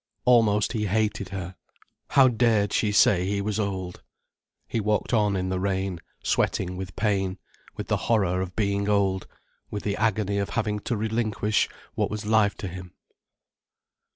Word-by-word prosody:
Almost 110 -3 +4
he 105 -3 -1
hated 105 -1 0
her. 95 -1 -6 0.5
How 135 -1 +6
dared 115 -4 +2
she 105 - +2
say 95 -2 +4
he 100 0 0
was 105 +2 -2
old. 95 -3 -3 0.7
He 115 - -1
walked 105 +3 0
on 105 -3 +3
in 95 0 -1
the 95 0 -1
rain, 95 -2 -1 0.2
sweating 90 -1 0
with 90 -1 -7
pain, 100 -3 0 0.4
with - - -5
the - - +1
horror 95 -5 +2
of 90 -1 -5
being 100 -1 0
old, 95 -2 +1 0.4
with 105 - -5
the 100 -1 -1
agony 105 -2 +1
of 100 - -2
having 105 -2 -1
to 115 +2 -2
relinquish 110 -1 0 0.2
what - - 0
was 110 -1 -5
life 105 -2 +3
to 100 - -6
him. 90 0 -9
100 Hz, 160 wpm, -26 LUFS, 95-110 Hz, 0.7 s, How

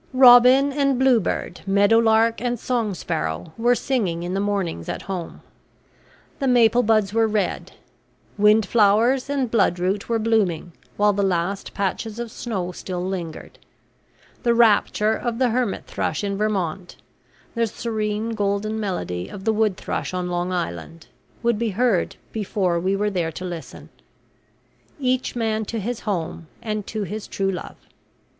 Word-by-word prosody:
Robin 255 +2 +7
and 275 -2 +1
bluebird, 240 -8 +1
meadow 200 +3 +4
lark 225 0 +3
and 245 -1 -1
song 230 -6 -1
sparrow, 80 - -3
were 240 +2 +3
singing 200 -12 -1
in 175 +1 -3
the 195 - 0
mornings 195 - -2
at - - -4
home; 180 -3 -6 1.0
the 275 - 0
maple 240 -1 +5
buds 215 -3 +2
were 225 0 +3
red; 210 -2 -2 0.6
windflowers 215 +4 +3
and 270 -5 -1
bloodroot 195 -2 +1
were 230 - +2
blooming 215 -7 0 0.3
while 210 0 +4
the 200 - 0
last 190 0 -1
patches 205 +3 -2
of 235 -1 -5
snow 190 -8 -4
still 180 0 -5
lingered; 175 -4 -6 0.8
the 235 -2 +2
rapture 220 -1 +3
of 235 +1 -3
the 255 -1 +2
hermithrush 220 -7 -2
in 200 -1 -1
Vermont, 195 -4 -2 0.6
the 230 -1 +1
serene 215 0 -3
golden 210 0 -1
melody 95 - -3
of 190 - -9
the 220 - +3
woodthrush 210 -3 -1
on 180 -1 -2
Long 175 +1 -1
Island, 160 - -4 0.4
would 235 -2 +1
be 230 -1 0
heard 215 -2 +1 0.2
before 190 -5 -1
we 190 +3 0
were 210 +1 0
there 170 -4 -1
to 185 - -6
listen. 175 -3 -8 1.1
Each 255 -2 0
man 220 -2 0
to 225 +2 -4
his 235 +3 -3
home, 170 -5 -4
and 215 -2 -4
to 215 -2 -3
his 210 +3 -6
true 195 0 -1
love! 180 - -6
210 Hz, 145 wpm, -22 LUFS, 185-230 Hz, 1.1 s, Robin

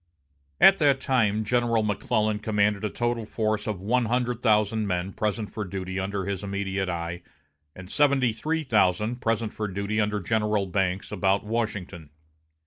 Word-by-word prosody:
At 195 - +7
that 140 -3 +4
time 110 -6 +1
General 115 0 +1
McClellan 105 0 0
commanded 105 -1 +1
a 105 - 0
total 120 -1 -2
force 110 -1 -1
of 105 -4 -2
one 120 +6 +1
hundred 125 +1 -1
thousand 110 -2 +2
men 90 +1 -2
present 105 0 -2
for 105 - -3
duty 95 0 -4
under 95 0 -2
his 100 0 -3
immediate 100 -1 -2
eye, 85 0 -4 0.5
and 95 -1 -10
seventy 135 -1 +2
three 160 +8 -2
thousand 105 -1 +2
present 115 -2 -1
for 105 - -3
duty 100 +3 -1
under 105 0 0
General 105 0 0
Banks 95 0 -1
about 100 0 +1
Washington. 100 -7 -3
105 Hz, 155 wpm, -26 LUFS, 95-115 Hz, 0.5 s, At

